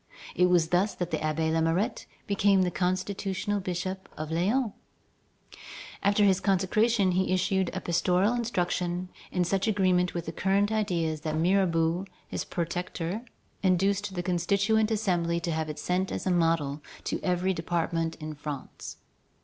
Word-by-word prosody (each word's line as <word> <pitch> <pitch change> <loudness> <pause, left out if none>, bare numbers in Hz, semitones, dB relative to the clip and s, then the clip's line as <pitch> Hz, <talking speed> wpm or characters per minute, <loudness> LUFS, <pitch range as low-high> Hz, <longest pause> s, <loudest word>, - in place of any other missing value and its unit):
It 180 +1 +4
was 170 -2 +3
thus 185 +4 +2
that 175 -1 -3
the - - 0
Abbé 160 +1 0
Lamourette 165 +5 0 0.2
became 200 -1 +3
the 180 - 0
constitutional 190 +3 -1
bishop 185 +1 -4
of 155 0 -5
Lyons. 210 +8 +1 1.3
After 205 +1 +3
his 195 -2 +4
consecration, 195 +2 +2
he 185 +1 +1
issued 185 0 +1
a 190 - -4
pastoral 180 +5 +2
instruction 180 -6 -1 0.2
in 180 - +1
such 195 +3 0
agreement 185 -4 +2
with 165 -1 -4
current 200 +2 +2
ideas 170 -8 0
that 155 0 -2
Mirabeau, 170 0 +2 0.2
his - - -4
protector, 175 +3 -3 0.4
induced 195 +1 +1
the 175 - -2
Constituent 200 +5 +2
Assembly 175 -6 +1
to 170 0 -3
have 160 -1 -2
it 150 - -5
sent 185 +2 -1
as - - -4
a 185 - +2
model 165 -4 +1 0.2
to - - -2
every 180 +1 +1
department 165 -1 -1
in 155 -1 -6
France. 145 -2 -7
180 Hz, 145 wpm, -28 LUFS, 170-195 Hz, 1.3 s, It